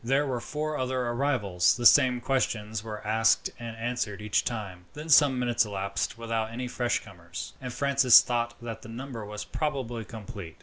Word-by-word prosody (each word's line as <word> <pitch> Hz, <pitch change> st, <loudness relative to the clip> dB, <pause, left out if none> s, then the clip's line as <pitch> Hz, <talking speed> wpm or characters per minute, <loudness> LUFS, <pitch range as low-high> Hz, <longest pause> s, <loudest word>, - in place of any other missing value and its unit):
There 135 Hz, +4 st, +2 dB
were 125 Hz, -3 st, -2 dB
four 155 Hz, +2 st, -3 dB
other 130 Hz, 0 st, -1 dB
arrivals. 120 Hz, -9 st, +1 dB
The 120 Hz, -, -4 dB
same 125 Hz, -2 st, +6 dB
questions 110 Hz, -5 st, -1 dB
were 105 Hz, -1 st, -7 dB
asked 110 Hz, +1 st, +2 dB
and 115 Hz, -1 st, -7 dB
answered 115 Hz, -3 st, -3 dB
each 105 Hz, -1 st, +1 dB
time. 100 Hz, -7 st, -5 dB
Then 150 Hz, +2 st, -8 dB
some 140 Hz, -3 st, +6 dB
minutes 120 Hz, -2 st, +2 dB
elapsed 100 Hz, 0 st, -3 dB
without 115 Hz, -1 st, -2 dB
any 125 Hz, +2 st, -5 dB
fresh 120 Hz, 0 st, -1 dB
comers, 90 Hz, -3 st, -8 dB
and 125 Hz, -1 st, -5 dB
Francis 135 Hz, -2 st, +6 dB
thought 120 Hz, -1 st, -1 dB
that 115 Hz, -1 st, -6 dB
the 110 Hz, -, -11 dB
number 120 Hz, -1 st, -7 dB
was 105 Hz, 0 st, -6 dB
probably 130 Hz, -7 st, -3 dB
complete. 100 Hz, -6 st, -9 dB
115 Hz, 175 wpm, -28 LUFS, 105-130 Hz, -, same